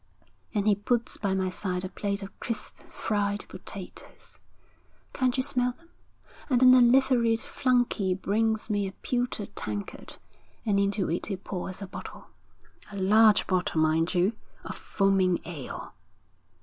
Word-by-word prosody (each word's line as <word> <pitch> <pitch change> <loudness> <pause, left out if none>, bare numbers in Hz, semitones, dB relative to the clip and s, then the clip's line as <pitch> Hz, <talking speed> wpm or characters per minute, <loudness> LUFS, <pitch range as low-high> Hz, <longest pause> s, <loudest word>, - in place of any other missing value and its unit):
And 205 0 +1
he 210 - +6
puts 230 +4 0
by 195 -2 0
my 190 -1 0
side 185 -1 -3
a - - -5
plate 200 0 -3
of 195 - -11
crisp 230 - -5
fried 205 -1 -1
potatoes. - - -10 0.7
Can't 255 -1 +1
you 260 - +2
smell 250 -2 0
them? 335 +5 -25 0.6
And 250 -3 +3
then 255 0 +8
a 255 - +7
liveried 240 -2 +4
flunky 245 -7 +1
brings 220 +3 0
me 205 -2 0
a 190 - -7
pewter 245 -1 -2
tankard, 105 -1 -5 0.5
and 200 -3 +2
into 200 -1 +1
it 170 - -2
he 195 - -3
pours 185 +1 -5
a - - -6
bottle, - - -9 0.6
a 200 - -7
large 210 +3 +5
bottle, 180 -3 0
mind 160 +3 +2
you, 180 +5 +3 0.3
of - - -6
foaming 195 -3 +2
ale.' 155 -7 -7
205 Hz, 150 wpm, -28 LUFS, 190-235 Hz, 0.7 s, then